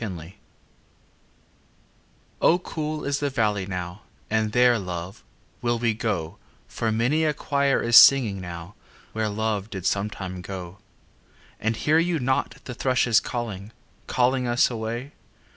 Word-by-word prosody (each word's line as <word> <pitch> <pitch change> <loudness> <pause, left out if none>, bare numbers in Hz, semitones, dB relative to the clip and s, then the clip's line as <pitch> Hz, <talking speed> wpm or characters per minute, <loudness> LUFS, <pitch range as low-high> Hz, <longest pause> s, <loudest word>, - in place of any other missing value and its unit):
XVI 90 -5 -6 2.1
O 170 - +5
cool 155 -3 -5
is 140 0 0
the 145 - 0
valley 105 -7 0
now 90 +1 -5 0.3
And 110 -1 +1
there, 125 0 +4
love, 90 0 -6 0.4
will 120 0 0
we 115 -1 +1
go 105 -8 -3 0.3
For 115 -1 -2
many 125 +8 +1
a 155 -2 +1
choir 140 -1 +1
is 115 0 +2
singing 115 -10 +7
now 85 +1 -8 0.4
Where 110 -1 -1
Love 105 -1 -2
did 95 -4 -6
sometime 100 -2 -2
go. 90 0 -8 0.8
And 110 +1 0
hear 155 +7 +2
you 170 0 +1
not 130 -1 0
the 125 - -7
thrushes 125 -2 +2
calling, 110 -3 -5 0.3
Calling 125 0 +1
us 120 +1 +3
away? 115 +4 -4
110 Hz, 135 wpm, -25 LUFS, 100-125 Hz, 2.1 s, singing